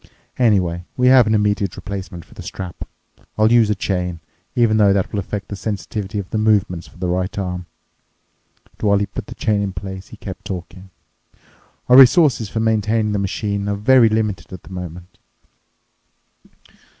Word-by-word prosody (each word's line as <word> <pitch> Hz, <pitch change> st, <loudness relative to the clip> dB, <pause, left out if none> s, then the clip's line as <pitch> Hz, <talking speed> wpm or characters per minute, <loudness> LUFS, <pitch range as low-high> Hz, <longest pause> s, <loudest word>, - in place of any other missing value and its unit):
Anyway, 95 Hz, -8 st, +2 dB
we 125 Hz, 0 st, +4 dB
have 130 Hz, -3 st, +6 dB
an 110 Hz, -, +2 dB
immediate 105 Hz, -2 st, 0 dB
replacement 95 Hz, -2 st, -7 dB
for -, -, -19 dB
the -, -, -10 dB
strap. 90 Hz, -2 st, -7 dB, 0.5 s
I'll 110 Hz, +1 st, +4 dB
use 115 Hz, -3 st, +5 dB
a 105 Hz, -, +1 dB
chain—even 90 Hz, -, -2 dB
though 100 Hz, -2 st, +5 dB
that 95 Hz, -2 st, 0 dB
will 105 Hz, -, 0 dB
affect 100 Hz, +1 st, -5 dB
the 100 Hz, -, -4 dB
sensitivity 100 Hz, 0 st, -4 dB
of 100 Hz, -2 st, -3 dB
the 110 Hz, -, 0 dB
movements 100 Hz, -5 st, +1 dB
for -, -, -18 dB
the 90 Hz, 0 st, -3 dB
right 90 Hz, +2 st, -2 dB
arm." 90 Hz, -2 st, -4 dB, 1.1 s
And 105 Hz, -, +1 dB
while 100 Hz, -, +4 dB
he 100 Hz, -, 0 dB
put 100 Hz, 0 st, -8 dB
the 120 Hz, -, -9 dB
chain 105 Hz, -3 st, 0 dB
in 100 Hz, -2 st, -2 dB
place, 95 Hz, +1 st, -7 dB
he -, -, -13 dB
kept -, -, -8 dB
talking, 95 Hz, +1 st, -7 dB, 1.0 s
"Our 125 Hz, -, +7 dB
resources 135 Hz, -, +6 dB
for 110 Hz, -, -3 dB
maintaining 110 Hz, 0 st, +1 dB
the 105 Hz, -, 0 dB
machine 100 Hz, +1 st, -2 dB
are 100 Hz, -, 0 dB
very 115 Hz, +3 st, +5 dB
limited 105 Hz, -5 st, -2 dB
at 95 Hz, -, -9 dB
the 95 Hz, -, -12 dB
moment. 90 Hz, 0 st, -8 dB
100 Hz, 175 wpm, -20 LUFS, 90-110 Hz, 1.1 s, Our